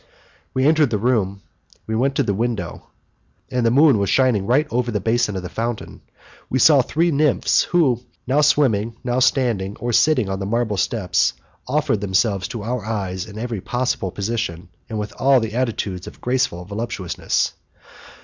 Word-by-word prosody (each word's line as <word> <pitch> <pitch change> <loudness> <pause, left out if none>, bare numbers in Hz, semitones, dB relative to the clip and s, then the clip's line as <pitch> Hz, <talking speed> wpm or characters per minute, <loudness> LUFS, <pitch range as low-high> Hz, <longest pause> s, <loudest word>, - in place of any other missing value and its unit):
We 130 +1 +2
entered 155 -2 +4
the 110 - 0
room, 100 -4 0 0.4
we 110 - -4
went 135 +4 +1
to - - +2
the 100 - 0
window, 105 -5 -3 0.6
and, 125 -2 0
the 115 - +4
moon 135 -4 +5
shining 115 -5 +2
right 140 +6 +3
over 120 0 0
the 105 -3 -1
basin 110 0 0
of 95 - -4
the - - -4
fountain, 115 +3 -4 0.5
we 130 - 0
saw 140 +2 +6
three 165 +7 0
nymphs 150 -2 +2
who, 140 -9 +2 0.2
now 135 +4 +2
swimming, 115 -7 +2
now 125 0 0
standing 115 -7 +1
or 120 0 -3
sitting 130 -5 +3
on 95 0 -3
the 95 - -3
marble 115 -1 0
steps, 100 -3 +1 0.3
offered 130 -6 0
themselves 100 -1 +1
to 115 -3 -6
our 120 0 -3
eyes 95 -3 -3
in 105 0 -10
every 115 -3 -4
possible 125 -4 -1
position, 95 -4 -3 0.2
and 110 - -3
in 105 0 -3
all 135 0 +5
the 110 -2 -4
attitudes 110 -7 -2
of - - -11
graceful 125 -9 -1
voluptuousness. 100 -3 -2
115 Hz, 170 wpm, -21 LUFS, 100-130 Hz, 0.6 s, saw